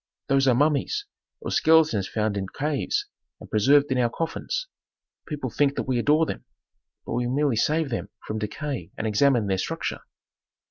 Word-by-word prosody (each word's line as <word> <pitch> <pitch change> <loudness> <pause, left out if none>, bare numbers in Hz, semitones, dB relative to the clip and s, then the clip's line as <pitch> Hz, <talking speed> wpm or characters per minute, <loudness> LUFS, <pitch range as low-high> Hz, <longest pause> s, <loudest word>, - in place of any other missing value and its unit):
Those 135 0 +3
are 125 - +5
mummies, 150 - +1 0.4
or - - -4
skeletons 155 -12 +4
found 105 +1 -1
in 95 -1 -2
caves 145 +6 -1 0.3
and - - -11
preserved 140 +7 +4
in 130 - +2
our 120 -1 +3
coffins. 165 - -3 0.6
People 145 -5 -4
think 140 +3 +2
that - - -1
we 130 -2 0
adore 150 +6 +3
them, - - -5 0.6
but - - -4
we 120 +1 0
merely 140 0 +1
save 155 +6 +1
them 115 -4 -3 0.2
from 110 0 -3
decay 110 - -4
and - - -3
examine 115 +2 +3
their 95 -1 0
structure." - - -3
135 Hz, 170 wpm, -25 LUFS, 110-150 Hz, 0.6 s, are